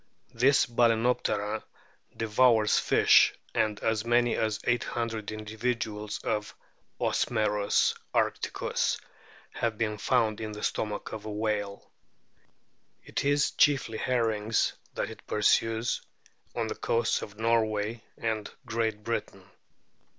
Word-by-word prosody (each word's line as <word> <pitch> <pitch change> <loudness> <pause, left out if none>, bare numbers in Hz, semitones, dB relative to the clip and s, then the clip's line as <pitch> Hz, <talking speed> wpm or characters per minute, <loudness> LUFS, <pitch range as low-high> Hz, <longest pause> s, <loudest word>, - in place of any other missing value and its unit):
This 135 +4 +4
Balcsnoptera 115 -3 +1 0.6
devours 115 -1 +4
fish, - - +5 0.2
and 105 -1 0
as 110 -1 0
many 120 0 +2
as 110 -1 0
800 115 -3 -1
individuals 110 0 -3
of 105 -1 -2 0.4
Osmerus 105 -3 +1 0.2
arcticiis - - 0 0.5
have 115 -2 -1
been 105 -2 -1
found 110 -2 +1
in 110 -1 -4
the 105 - -8
stomach 105 -1 -2
of 110 -1 -6
a 110 - -4
whale. 105 -1 -3 1.1
It - - -3
is 145 0 +2
chiefly 135 -6 +2
herrings 115 -3 +1 0.2
that - - -2
it - - -13
pursues 115 +2 +1 0.5
on - - 0
the - - -3
coasts 115 +1 0
of 105 0 -9
Norway 110 -1 0 0.2
and 110 -2 -2 0.2
Great 110 -2 -2
Britain. - - -4
110 Hz, 110 wpm, -28 LUFS, 105-115 Hz, 1.1 s, fish